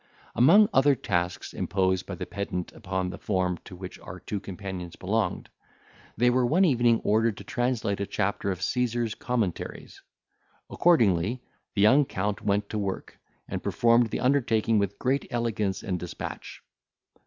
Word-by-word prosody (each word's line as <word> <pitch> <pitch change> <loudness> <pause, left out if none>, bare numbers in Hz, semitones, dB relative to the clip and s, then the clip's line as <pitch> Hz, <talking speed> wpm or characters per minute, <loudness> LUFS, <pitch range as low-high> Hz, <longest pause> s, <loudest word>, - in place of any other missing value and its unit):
Among 185 - +6
other 140 +1 +5
tasks 90 -6 -2
imposed 95 -1 0
by - - -5
the - - -5
pedant 100 -3 -4
upon 95 0 -3
the - - -9
form 90 -3 -1
to 90 - -10
which 90 0 -9
our - - -9
two 105 - -4
companions 95 -3 -7
belonged, 100 0 -1 0.7
they 125 +2 +4
were 125 +1 +2
one 165 +10 +4
evening 120 -6 +3
ordered 110 0 +2
to - - -9
translate 120 -5 -1
a 100 - -2
chapter 100 -1 -1
of 95 -1 -3
Caesar's 120 0 0
Commentaries. 115 -8 -3 0.7
Accordingly 115 - +3 0.3
the 100 - +2
young 135 +7 +6
Count 100 -2 -2
went 100 0 0
to 110 - -2
work, 100 -2 -4 0.3
and - - -4
performed 115 0 +3
the - - -3
undertaking 115 -5 +2
with 100 0 -1
great 135 +2 0
elegance 115 -6 -1
and 90 -2 -2
despatch. 90 0 -7
105 Hz, 155 wpm, -27 LUFS, 95-120 Hz, 0.7 s, Among